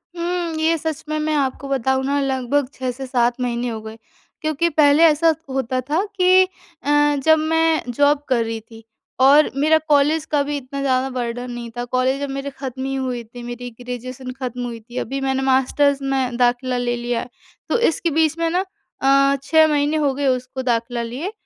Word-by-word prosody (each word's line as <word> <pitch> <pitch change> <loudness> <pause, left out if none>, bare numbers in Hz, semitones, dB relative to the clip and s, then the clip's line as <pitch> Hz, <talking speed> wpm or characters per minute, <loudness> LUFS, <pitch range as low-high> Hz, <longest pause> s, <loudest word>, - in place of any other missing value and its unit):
उम, 340 -1 -2
ये 325 +1 +2
सच 315 -2 -4
में 310 - -1
मैं 310 0 -1
आपको 275 -1 -1
बताऊँ 265 0 +1
ना, 280 +1 +1
लगभग 265 0 0
6 255 -1 -3
से 265 +2 -7
7 245 -1 +1
महीने 245 0 -1
हो 220 -2 -5
गए। 220 0 -9 0.4
क्योंकि 310 +2 0
पहले 295 0 +4
ऐसा 325 0 +5 0.2
होता 260 -1 -1
था 320 +6 +1
कि 370 0 +5 0.4
अ, 295 0 +3
जब 315 +1 +5
मैं 325 0 +2
जॉब 285 +3 +3
कर 240 -3 +2
रही 225 0 -4
थी, 225 0 -15 0.4
और 280 +3 +6
मेरा 310 +3 +4
कॉलेज 300 +2 +3
का 295 -2 +1
भी 290 0 -3
इतना 275 +1 -6
ज़्यादा 265 -1 +1
बर्डन 245 -1 -4
नहीं 240 -1 -6
था, 240 - -2
कॉलेज 255 +2 0
जब 285 0 -3
मेरी 275 +1 -4
खत्म 265 -1 -6
ही 270 0 -2
हुई 255 -3 -3
थी, 240 +2 -11
मेरी 240 +1 -6
ग्रेजुएशन 255 +1 -6
खत्म 250 -2 -4
हुई 235 -1 -6
थी 240 +3 -12
अभी 275 +2 -3
मैंने 265 0 0
मास्टर्स 270 +2 +2
में 265 -3 -1
दाखिला 250 +1 +1
ले 245 0 -1
लिया। 240 0 -2 0.4
तो - - +2
इसके 335 +1 -1
बीच 320 0 +2
में 335 0 0
ना 365 +3 0 0.4
अ, 275 +1 +4
6 315 +2 +5
महीने 295 0 +1
हो 290 -3 +1
गए 280 +1 -1
उसको 255 0 -1
दाखिला 240 -1 -1
लिए 260 - -5
270 Hz, 195 wpm, -21 LUFS, 245-295 Hz, 0.4 s, और